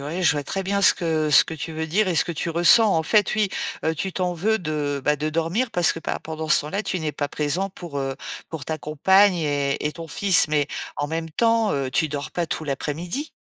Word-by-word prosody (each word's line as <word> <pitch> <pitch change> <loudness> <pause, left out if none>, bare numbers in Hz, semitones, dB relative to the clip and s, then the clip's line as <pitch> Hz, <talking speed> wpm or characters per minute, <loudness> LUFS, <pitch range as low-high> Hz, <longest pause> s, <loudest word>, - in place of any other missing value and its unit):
Oui 160 +6 -4
je 175 - +4
vois 145 -2 -3
très 195 +7 -3
bien 200 +1 -1
ce - - +8
que 160 -3 -1
ce 150 - +7
que 160 - -7
tu 160 +1 -6
veux 160 0 -4
dire 190 +6 +1
et 180 - 0
ce - - +2
que 175 - -3
tu 170 +1 -3
ressens. 175 +6 +6
En 160 - +1
fait, 205 +5 +2
oui, 215 -2 +1 0.3
heu, 160 +1 0
tu 190 +4 -4
t'en 180 -1 -2
veux 215 +6 0
de, 150 -4 -3
bah, 150 +2 +1
de 155 +2 -3
dormir 165 +10 -1
parce 175 -1 +3
que - - -6
pa 165 - -4
pendant 160 0 -6
ce - - +7
temps-là, 185 +8 -4
tu 185 - -3
n'es 155 -1 -2
pas 145 - -3
présent 150 +7 -2
pour, 170 -6 -7
heu, 135 -1 -3 0.3
pour 155 -4 -7
ta 160 - -2
compagne 190 +7 +3
et 145 -3 -1
et 150 - -2
ton 165 -1 -9
fils. 190 +2 +3
Mais 150 -2 +1 0.3
en 145 - -2
même 165 +1 -4
temps, 230 +4 +1
heu, 135 -2 -2
tu 155 +4 +1
dors 145 -1 -5
pas 175 -1 -2
tout 160 - -4
l'après-midi? 165 - -4
160 Hz, 255 wpm, -23 LUFS, 150-185 Hz, 0.3 s, ce